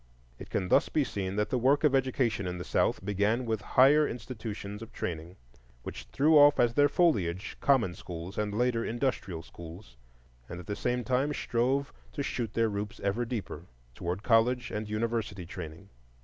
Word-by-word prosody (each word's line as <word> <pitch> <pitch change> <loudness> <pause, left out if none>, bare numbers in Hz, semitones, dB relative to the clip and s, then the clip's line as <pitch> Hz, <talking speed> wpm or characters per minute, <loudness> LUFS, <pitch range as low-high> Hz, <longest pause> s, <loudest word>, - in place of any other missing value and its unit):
It - - -9
can 90 - -2
thus - - +4
be 150 - +2
seen 100 -6 -3
that 105 +1 -1
the 125 - +1
work 135 +5 +3
of 150 -3 +4
education 130 -6 +1
in 90 0 -3
the 90 - -5
South 95 - 0
began 105 +5 +1
with 110 -2 -1
higher 145 +7 +5
institutions 110 -4 -6
of 115 +1 -9
training, 85 -3 -5 0.5
which 60 - -7
threw 150 +2 +5
off 145 0 +7
as 120 -1 +4
their 145 +3 +4
foliage 100 - +1
common 125 -10 +3
schools, 90 +2 -8
and 105 -1 -1
later 115 +1 +1
industrial 115 -8 -2
schools, 85 - -12 0.5
and 85 - -6
at 90 - -9
the 105 - -3
same 125 +2 -1
time 135 +4 0
strove 130 +4 0 0.2
to 140 - -2
shoot 115 -5 -3
their 115 0 +3
roots 105 0 -4
ever 100 +5 0
deeper 95 -9 -5 0.3
toward 90 - -4
college 120 +1 +2
and 105 0 -4
university 105 -3 -2
training. 85 +2 -9
110 Hz, 175 wpm, -29 LUFS, 95-125 Hz, 0.5 s, off